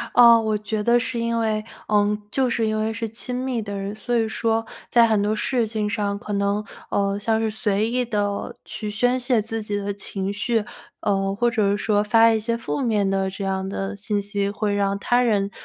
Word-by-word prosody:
呃， 235 -1 +8
我 220 -1 0
觉 210 0 -3
得 240 +1 +4
是 245 -1 -2
因 230 0 0
为， 215 -1 0 0.2
呃 210 0 +2
就 260 0 +1
是 230 -1 0
因 215 0 0
为 220 +1 -1
是 230 0 -3
亲 245 +3 -5
密 255 -2 -2
的 200 -1 -5
人， 195 +1 -4
所 240 +3 -2
以 225 -1 +2
说 225 0 0 0.3
在 235 -1 +6
很 215 -2 +2
多 210 +1 +1
事 230 +1 0
情 215 -1 -2
上 205 -2 -1
可 210 0 -5
能， 200 +1 0 0.3
呃 200 0 +1
像 220 +1 +1
是 220 -1 0
随 215 0 0
意 250 0 0
地 205 -3 -2
去 210 -2 -5
宣 245 +4 +1
泄 245 -2 +2
自 225 +1 -3
己 210 -1 -3
的 205 0 -2
情 195 -1 -4
绪， 220 +2 0 0.4
呃， 195 -1 0
或 240 +3 +2
者 210 -4 +2
是 205 - +1
说 205 0 +1
发 225 +2 +5
一 220 - +2
些 230 +2 -1
负 255 +4 -3
面 210 -5 +1
的 195 0 0
这 195 +1 -6
样 190 0 -1
的 195 +1 -3
信 205 0 -2
息， 200 0 -1
会 205 0 -1
让 200 -1 +1
他 245 +3 +2
人 205 -4 +1
215 Hz, 240 characters per minute, -23 LUFS, 205-230 Hz, 0.4 s, 呃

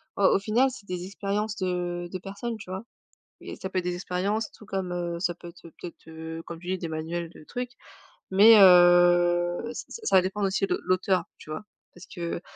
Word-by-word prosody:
au 200 - -1
au - - +3
final, 225 +6 +2
c'est 205 -5 -12
des 180 -1 -4
expériences 205 +2 -3
de 175 -1 -2
de 185 - -3
personnes, 205 +5 -5
tu 200 -4 -12
vois? 190 +3 -5 0.6
Et - - -8
ça 190 - -5
peut 190 - -2
être 180 - -2
des 180 0 -1
expériences, 195 +5 -2
tout - - -15
comme, 190 -2 -3
heu, 175 -1 -3
ça 175 -1 0
peut 175 - -11
être 170 - -15 0.2
peut-être, 170 -2 -10
heu, 160 0 -7
comme 170 -1 -8
tu 175 - -11
dis, 185 0 -1
des 170 -2 -5
manuels 165 +1 -4
de 155 - -15
trucs, 245 +5 -5 0.6
mais, 215 +4 +8
heu, 175 -1 +6 0.2
ça 465 - -8
ça 190 - +5
dépend 190 +3 -3
aussi 195 0 +1
de - - 0
l'auteur, 185 0 +1
tu - - -15
vois? 155 +7 -5 0.3
Parce 175 - -13
que 170 -1 -5
180 Hz, 210 wpm, -26 LUFS, 175-195 Hz, 0.6 s, mais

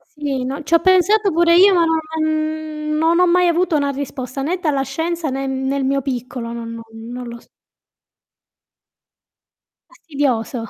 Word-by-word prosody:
Sì, 280 -4 -4
no 275 +4 -4
ci 315 +3 -1
ho 335 - +6
pensato 375 +4 +3
pure 335 +1 +4
io 390 +3 +7
ma 340 -2 +4 0.4
non 310 0 -2 0.2
non 330 +2 +3
ho 360 - +5
mai 360 0 +3
avuto 345 0 +1
una 285 -1 0
risposta 270 -1 -5
né 340 +7 -1
dalla 295 -6 0
scienza 320 +4 -3
né 270 +1 -3
nel 265 +1 -2
mio 275 +1 0
piccolo, 250 -2 -5
non 230 -1 -6
non 230 - -8 0.3
non 250 0 -6
lo 235 0 -9
s - - -25 2.4
Fastidioso. 275 - -2
290 Hz, 155 wpm, -19 LUFS, 265-335 Hz, 2.4 s, io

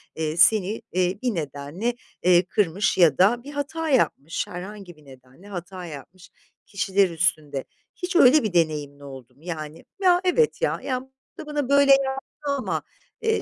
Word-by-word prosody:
eee, 160 0 -3
seni, 205 +4 +3
eee, 185 +1 0
bir 245 -6 -1
nedenle, 150 - -3 0.3
eee, 180 0 +5
kırmış 195 -1 0
ya 165 -7 +5
da 230 +6 +3
bir 285 - -9
hata 295 +3 -3
yapmış, 170 - 0
herhangi 185 0 -9
bir 150 -1 -21
nedenle 130 +7 -17
hata 180 -1 -7
yapmış 165 +4 -11 0.4
kişiler 195 -2 +1
üstünde. 155 -4 0 0.3
Hiç 360 +1 -5
öyle 300 -2 +6
bir 215 -4 -2
deneyimin 150 -4 0
oldu 130 -3 -12
mu? 145 - -24
Yani, 155 -2 -7 0.2
"Ya, 360 -1 +4
evet 450 +7 +2
ya, - - 0
ya, 255 -1 -2
bu 265 0 -19 0.3
da - - -8
bana 295 -3 -3
böyle 280 0 +5
yaptı 270 0 +2 0.3
ama, 265 - -2 0.4
eee, 445 0 +1
185 Hz, 165 wpm, -24 LUFS, -, 0.4 s, öyle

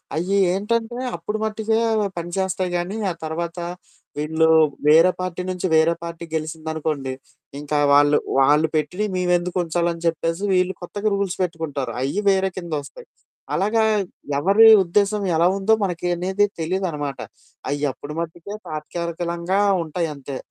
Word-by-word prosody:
అయ్యి 180 +5 0 0.2
ఏంటంటే 225 +4 -1 0.2
అప్పుడు 175 +6 -4
మట్టికే 220 0 0 0.4
పనిచేస్తాయి 185 +1 -2
గానీ 180 +5 -3
ఆ - - -4
తర్వాత 170 +2 -4 0.6
వీళ్ళు 160 +2 +1 0.4
వేరే 165 +4 +7
పార్టీ 185 -1 -3
నుంచి 185 0 -2
వేరే 160 +1 +4
పార్టీకి 170 -1 -7
గెలిసిందనుకోండి 155 -3 -3 0.5
ఇంకా 150 0 -2 0.2
వాళ్ళు, 145 +1 +5 0.2
వాళ్ళు 150 +4 +4
పెట్టిని 155 +7 -1
మేమెందుకు 180 0 0
ఉంచాలని 170 0 -1
చెప్పేసి 165 +3 -1
వీళ్ళు 185 0 +2
కొత్తగా 205 +4 -2
రూల్స్ 195 -2 -2
పెట్టుకుంటారు. 160 -6 -3
అయ్యి 140 +10 -1
వేరే 190 0 +2
కిందొస్తాయి. 170 - -6 0.5
అలాగా 220 +3 +2 0.6
ఎవరి 200 +8 +6 0.2
ఉద్దేశ్యం 200 +3 +1
ఎలా 170 +2 +4
ఉందో 200 +3 +2
మనకి 180 -2 -2
అనేది 190 +4 +1 0.2
తెలీదనమాట. 160 -5 -2 0.5
అయ్యప్పుడు 145 0 -3
మట్టికే 170 +4 -7
తాత్కాలికలంగా 170 +4 -3 0.2
ఉంటాయి 165 +1 -2
అంతే. 140 -1 -7
170 Hz, 125 wpm, -22 LUFS, 160-190 Hz, 0.6 s, వేరే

